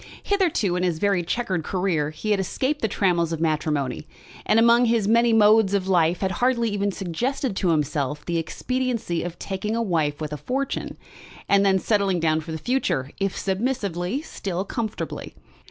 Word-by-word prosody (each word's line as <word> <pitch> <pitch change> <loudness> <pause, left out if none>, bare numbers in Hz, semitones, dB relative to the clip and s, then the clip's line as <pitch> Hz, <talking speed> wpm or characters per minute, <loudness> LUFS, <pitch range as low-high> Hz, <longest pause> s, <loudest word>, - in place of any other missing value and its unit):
Hitherto 340 - +1
in 180 - -1
his 175 -3 0
very 200 +1 +1
chequered 185 -1 -2
career 180 -4 0
he 155 +8 -4
had 205 - +2
escaped 260 +10 -1
the 220 - +2
trammels 175 -5 +1
of 165 - -2
matrimony, 150 - -1 0.4
and 215 - +4
among 235 +1 +5
his 225 -3 +2
many 235 +2 +4
modes 215 -2 +5
of 190 -1 -1
life 175 -2 +2
had 190 -1 0
hardly 235 +3 +1
even 205 0 0
suggested 220 - -2
to 185 - +1
himself 150 -2 -1
the 170 -1 0
expediency 240 0 -2
of 175 0 -5
taking 200 +3 -3
a 230 - 0
wife 155 -7 0
with 150 -1 -4
a - - -3
fortune, 270 - -3 0.5
and 200 0 +4
then 195 -1 +4
settling 195 -2 +1
down 160 -1 +1
for 160 +1 -8
the 160 - -3
future, 160 - -1
if 195 -1 -1
submissively, 200 - -2
still 190 - -4
comfortably. 225 0 -5
195 Hz, 175 wpm, -24 LUFS, 165-230 Hz, 0.5 s, among